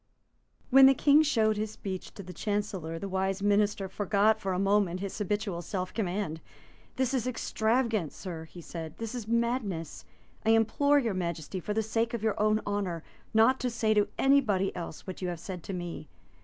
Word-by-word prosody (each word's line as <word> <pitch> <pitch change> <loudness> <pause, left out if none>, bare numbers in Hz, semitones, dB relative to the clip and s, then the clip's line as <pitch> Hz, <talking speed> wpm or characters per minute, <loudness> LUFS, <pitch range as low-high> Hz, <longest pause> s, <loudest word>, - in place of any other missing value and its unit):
When 265 +1 +9
the 270 - +5
King 290 +3 +5
showed 220 -8 +2
his 215 +1 -2
speech 190 -3 -6
to 200 - -8
the 180 0 -9
Chancellor, 195 -5 -3
that 200 - -5
wise 190 +1 -1
minister 205 -1 +2
forgot 205 +3 +2
for 195 - -2
a 180 - 0
moment 195 -2 +2
his 195 0 -5
habitual 205 -3 -2
self 185 +1 -4
command. 185 -6 -2 0.5
"This 260 0 0
is 255 -2 0
extravagance, 225 - 0
Sir," 165 -4 -6
he 175 +2 -12
said: 160 -1 -7
"this 225 0 -5
is 240 -4 -5
madness. 230 - -1 0.4
I 225 +1 +5
implore 285 +6 +3
your 235 -7 +1
Majesty, 170 0 -3
for 210 +4 -4
the 220 - +1
sake 225 +2 -1
of 225 - -5
your 220 -2 0
own 215 0 +3
honour, 195 -5 -2 0.3
not 225 +4 +4
to 250 - -1
say 225 -2 +1
to 210 -1 +3
anybody 235 -9 +3
else 170 -3 -7
what 185 0 -7
you 185 - -1
have 175 -2 -4
said 180 0 -6
to - - -5
me." 175 -4 -6
205 Hz, 190 wpm, -29 LUFS, 185-225 Hz, 0.5 s, When